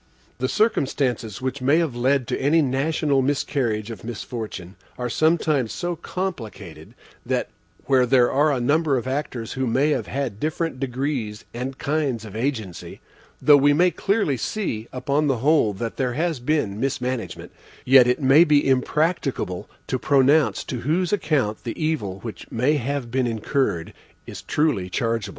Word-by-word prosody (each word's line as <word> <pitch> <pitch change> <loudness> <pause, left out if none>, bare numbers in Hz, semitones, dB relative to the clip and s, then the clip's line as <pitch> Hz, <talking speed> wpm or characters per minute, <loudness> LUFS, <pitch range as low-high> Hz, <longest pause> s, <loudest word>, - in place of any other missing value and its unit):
The 130 0 0
circumstances 135 - 0
which 130 +1 -3
may 140 +5 +3
have 165 -7 0
led 130 +1 +1
to - - -2
any 155 +4 +3
national 140 +1 +1
miscarriage 130 -5 -1
or 115 - -6
misfortune 110 -5 -6 0.2
are 125 -1 -3
sometimes 155 -6 +2
so 175 0 -3
complicated 110 - -6 0.3
that, - - -1 0.4
where 130 -2 +3
there 120 -1 +4
are 145 +3 +3
a 135 - 0
number 145 +3 +2
of 120 - -3
actors 130 -4 -3
who 130 -1 -1
may 135 +6 +2
have 120 -8 -1
had 130 -7 -3
different 155 -1 -2
degrees 130 -4 -3
and 130 +2 -5
kinds 140 -7 -1
of 105 -1 -10
agency, 110 -7 -4 0.4
though 150 - +7
we 145 +1 +4
may 175 +4 +4
clearly 195 - 0
see 120 - -3
upon 140 +3 0
the 135 -3 +1
whole 140 -3 +3
that 115 +4 -5
there 125 -2 0
has 160 +1 -1
been 120 -6 -1
mismanagement, 125 -2 -3 0.3
yet 130 -1 +7
it 125 - +2
may 140 +3 +6
be 150 -4 +3
impracticable 135 - 0 0.2
to - - -2
pronounce 140 +2 +3
to 125 - -5
whose 170 - 0
account 140 - 0
the 115 - -5
evil 155 - -1
which 115 -1 -8
may 125 +6 +2
have 135 -2 -3
been 130 0 +1
incurred 110 - -1 0.3
is - - -8
truly 145 -12 0
chargeable.) 115 +3 -1
130 Hz, 160 wpm, -23 LUFS, 115-150 Hz, 0.4 s, though